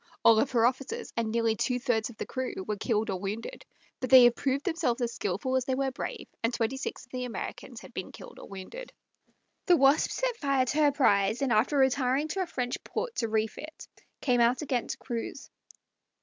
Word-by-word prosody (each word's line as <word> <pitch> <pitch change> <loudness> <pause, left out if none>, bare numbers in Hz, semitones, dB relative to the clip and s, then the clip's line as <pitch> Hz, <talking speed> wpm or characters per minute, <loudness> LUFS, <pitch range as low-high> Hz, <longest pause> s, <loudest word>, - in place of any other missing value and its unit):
All 225 -1 +7
of 275 - +2
her 235 -2 +3
officers, 270 - -2
and 230 -1 -1
nearly 230 0 +1
two 250 +3 0
thirds 240 -3 0
of 230 - -13
the - - -4
crew, 260 -1 -4
were 210 - -1
killed 220 0 0
or 185 - -3
wounded; 210 - -5 0.4
but 255 - -3
they 260 -1 +10
had 240 0 +6
proved 275 +1 -1
themselves 325 -9 0
as 235 -1 -1
skilful 205 +7 -2
as 260 -1 +1
they 260 - 0
were 270 0 0
brave, 255 - -6
and 230 - +1
twenty 235 +1 -1
six 265 - -5
of 245 - -33
the 255 -1 -3
Americans 245 - -6
had - - -13
been - - -5
killed - - -12
or - - -10
wounded. 200 - -8 0.8
The 355 -2 +6
Wasp 275 +2 +4
set - - -1
fire 275 - +1
to 265 - -2
her 295 -1 +5
prize, 220 -3 +2
and 255 -3 +2
after 240 +7 +2
retiring 265 +2 +2
to 385 +4 -1
a 370 - -1
French 250 -6 -3
port 485 - -4
to 230 - 0
refit, 220 +8 -3 0.3
came 245 -3 +2
out 245 +4 +3
again 255 -4 -1
to - - -4
cruise. 240 +3 -6
250 Hz, 215 wpm, -29 LUFS, 230-275 Hz, 0.8 s, they